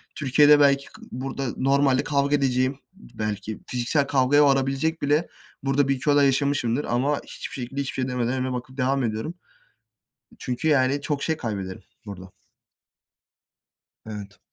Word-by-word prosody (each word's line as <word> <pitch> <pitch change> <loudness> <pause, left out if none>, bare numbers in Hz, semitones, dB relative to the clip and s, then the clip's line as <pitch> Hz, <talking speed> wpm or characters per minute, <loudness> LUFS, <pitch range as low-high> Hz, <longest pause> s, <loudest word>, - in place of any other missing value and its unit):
Türkiye'de 145 +1 +5
belki 140 -1 +4
kı - - -16
burada 135 +1 -4
normalde 135 0 +2
kavga 140 0 +1
edeceğim. 130 0 0
Belki 105 - -6
fiziksel 125 +4 0
kavgaya 140 +2 +4
varabilecek 135 +4 +1
bile 150 +4 +1 0.4
burada 135 0 +2
1-2 135 +2 0
olay 145 0 +5
yaşamışımdır 135 -2 +1
ama 135 +5 0
hiçbir - - -8
şekilde, 135 +2 -4
hiçbir 135 - -4
şey 130 0 -2
demeden 125 -1 -1
önüme 130 -1 -2
bakıp 130 +2 -7
devam 135 0 +1
ediyorum. 110 +8 -3 1.1
Çünkü, 125 +5 -2
yani, 140 -1 +3
çok 140 0 -3
şey 160 - 0
kaybederim 100 -8 -5 0.2
burada. 95 -2 -9 1.7
Evet. 100 -3 -8
135 Hz, 135 wpm, -24 LUFS, 125-140 Hz, 1.7 s, Türkiye'de